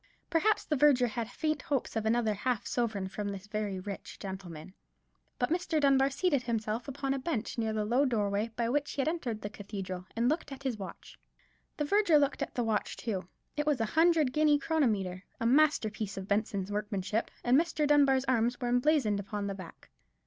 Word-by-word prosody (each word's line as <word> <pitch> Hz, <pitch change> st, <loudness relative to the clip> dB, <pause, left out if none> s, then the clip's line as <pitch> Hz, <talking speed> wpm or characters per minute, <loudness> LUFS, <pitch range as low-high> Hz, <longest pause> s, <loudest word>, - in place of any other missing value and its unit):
Perhaps 420 Hz, +6 st, +2 dB
the 305 Hz, -, 0 dB
verger 275 Hz, -3 st, +5 dB
had 235 Hz, -1 st, -3 dB
faint 305 Hz, +3 st, -1 dB
hopes 275 Hz, -5 st, -2 dB
of 220 Hz, -1 st, 0 dB
another 225 Hz, -1 st, +2 dB
half 230 Hz, +2 st, -1 dB
sovereign 215 Hz, -6 st, -1 dB
from 205 Hz, +2 st, -4 dB
this 195 Hz, -1 st, -6 dB
very 205 Hz, -2 st, -3 dB
rich 200 Hz, +1 st, -7 dB
gentleman. 190 Hz, -3 st, -8 dB, 0.6 s
But 245 Hz, +3 st, 0 dB
Mr. 340 Hz, -2 st, +1 dB
Dunbar 275 Hz, -1 st, +4 dB
seated 285 Hz, 0 st, +1 dB
himself 225 Hz, -1 st, -2 dB
upon 275 Hz, 0 st, -2 dB
a 275 Hz, -, -2 dB
bench 255 Hz, -6 st, -2 dB
near 220 Hz, -1 st, 0 dB
the 215 Hz, -1 st, -1 dB
low 245 Hz, +6 st, +3 dB
doorway 210 Hz, -3 st, 0 dB
by 235 Hz, -1 st, 0 dB
which 290 Hz, +4 st, 0 dB
he 280 Hz, -, 0 dB
had 270 Hz, -, -1 dB
entered 260 Hz, -10 st, -2 dB
the 205 Hz, -, -3 dB
cathedral, 195 Hz, -3 st, -6 dB
and 230 Hz, +1 st, +2 dB
looked 300 Hz, 0 st, -1 dB
at 270 Hz, 0 st, -8 dB
his 250 Hz, -6 st, -2 dB
watch. 195 Hz, -, -9 dB, 0.6 s
The 295 Hz, -, 0 dB
verger 395 Hz, -1 st, +4 dB
looked 280 Hz, -1 st, +1 dB
at -, -, -3 dB
the 245 Hz, -, +1 dB
watch 220 Hz, -2 st, -1 dB
too; 195 Hz, -6 st, -3 dB, 0.3 s
it 295 Hz, 0 st, -1 dB
was 295 Hz, -4 st, +2 dB
a 225 Hz, -, +1 dB
hundred 320 Hz, 0 st, +3 dB
guinea 300 Hz, -1 st, +4 dB
chronometer, 215 Hz, -, 0 dB, 0.2 s
a 230 Hz, -, -2 dB
masterpiece 230 Hz, -7 st, +2 dB
of 190 Hz, 0 st, -5 dB
Benson's 200 Hz, -1 st, -1 dB
workmanship; 210 Hz, 0 st, -2 dB
and 245 Hz, +1 st, +4 dB
Mr. 315 Hz, 0 st, +2 dB
Dunbar's 280 Hz, -2 st, +4 dB
arms 245 Hz, -1 st, +1 dB
were 245 Hz, -, -1 dB
emblazoned 245 Hz, -4 st, +2 dB
upon 205 Hz, +1 st, -4 dB
the 200 Hz, -, -2 dB
back. 185 Hz, -4 st, -11 dB
240 Hz, 195 wpm, -31 LUFS, 205-285 Hz, 0.6 s, verger